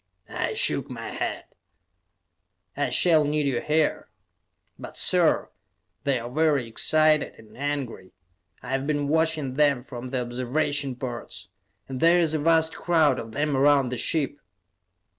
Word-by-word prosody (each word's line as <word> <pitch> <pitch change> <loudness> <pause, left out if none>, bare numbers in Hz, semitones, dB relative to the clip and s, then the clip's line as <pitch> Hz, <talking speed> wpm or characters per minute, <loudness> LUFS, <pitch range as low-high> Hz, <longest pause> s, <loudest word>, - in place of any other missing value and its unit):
I - - -3
shook - - +1
my - - -6
head. - - -4 1.3
"I - - -1
shall 160 -4 +4
need 150 0 0
you 130 -4 0
here." 155 0 0 0.7
"But, - - -9
sir, - - +2 0.5
they 140 -2 +2
are 120 0 -6
very 145 0 +1
excited 155 +6 +2
and 110 -1 -17
angry; 140 -8 -4 0.5
I 125 - -8
have 135 +1 -1
been 145 -2 0
watching 160 -4 +1
them 140 -3 +2
from 125 -1 -8
the 125 -1 -2
observation 130 +3 -1
ports. 120 -1 -7 0.4
And 130 -1 -5
there 170 +3 +5
is 165 -3 +2
a 155 - 0
vast 160 +1 +2
crowd 155 -7 +2
of 115 -1 -8
them 145 +1 0
around 140 -1 +4
the 125 - -4
ship." 145 -2 -1
145 Hz, 145 wpm, -25 LUFS, 130-155 Hz, 1.3 s, there